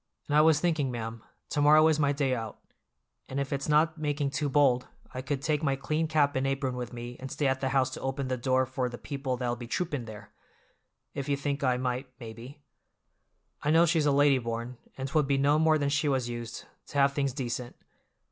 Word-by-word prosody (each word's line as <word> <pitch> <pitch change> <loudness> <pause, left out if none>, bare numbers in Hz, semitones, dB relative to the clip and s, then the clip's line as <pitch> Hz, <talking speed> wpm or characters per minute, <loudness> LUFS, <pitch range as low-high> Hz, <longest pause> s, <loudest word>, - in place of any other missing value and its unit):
And 145 - 0
I 150 - +7
was 155 -1 +5
thinking, 155 -5 +1
ma'am, 115 -2 -5 0.3
to 145 - 0
morrow 155 +2 +7
is 155 -1 +2
my 145 -2 +3
day 140 -2 0
out, 115 -4 -4 0.7
and 135 - -3
if 140 +1 -2
it's 140 +1 -3
not 155 +1 +3
making 145 -2 -1
too 145 0 -1
bold 135 -3 +3 0.3
I 130 - -4
could 135 +1 -3
take 150 -2 +1
my 140 -4 +1
clean 155 +4 -1
cap 150 -2 +2
and 130 +1 +1
apron 135 -1 -1
with 125 -1 -5
me 120 0 -7
and 135 - -6
stay 150 - -2
at 130 0 +1
the 130 - 0
house 130 -1 +2
to - - -7
open 135 0 -2
the 130 - -1
door 130 +1 +1
for 130 -1 -2
the 120 - -7
people 135 -2 -4
that'll 120 -1 -1
be 120 0 -8
troopin' 145 -3 -2
there—if 115 +5 -12
you 140 - +1
think 140 0 -2
I 125 -2 +2
might, 125 +1 -2
maybe. 120 +5 -10 1.0
I 145 - -1
know 165 +2 +6
she's 160 -2 +2
a - - +4
lady 140 -1 +4
born, 115 +1 -4 0.2
and 135 0 -3
'twould 145 0 +1
be 140 0 +2
no 145 +2 +3
more 160 0 +4
than 145 -2 0
she 150 +1 +1
was 130 -3 0
used, 120 -1 -6 0.2
to - - -6
have 140 0 +4
things 140 -1 0
dacent." 125 -2 -4
135 Hz, 225 wpm, -29 LUFS, 125-145 Hz, 1.0 s, I